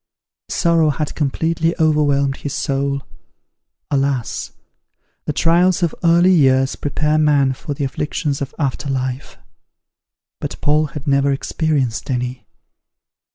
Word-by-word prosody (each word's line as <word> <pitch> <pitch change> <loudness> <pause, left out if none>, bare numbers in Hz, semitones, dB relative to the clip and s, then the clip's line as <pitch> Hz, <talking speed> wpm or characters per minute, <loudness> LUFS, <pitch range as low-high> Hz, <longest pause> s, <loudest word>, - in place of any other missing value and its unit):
Sorrow 165 -3 +2
had 150 +1 -2
completely 160 +3 0
overwhelmed 145 -3 +2
his 145 - -5
soul. 140 -1 -1 0.9
Alas! 135 -4 -1 0.7
the - - -1
trials 175 +4 +3
of 170 - +1
early 170 +2 +5
years 135 -5 +3
prepare 150 +1 0
man 145 -3 +3
for 145 +2 -6
the 140 - -3
afflictions 140 +1 -2
of 140 - -5
after 140 -1 -2
life; 130 0 -3 1.0
but - - -5
Paul 150 +1 +2
had 145 - -8
never 140 0 +2
experienced 135 -4 -1
any. 125 -1 -3
145 Hz, 115 wpm, -19 LUFS, 135-155 Hz, 1.0 s, early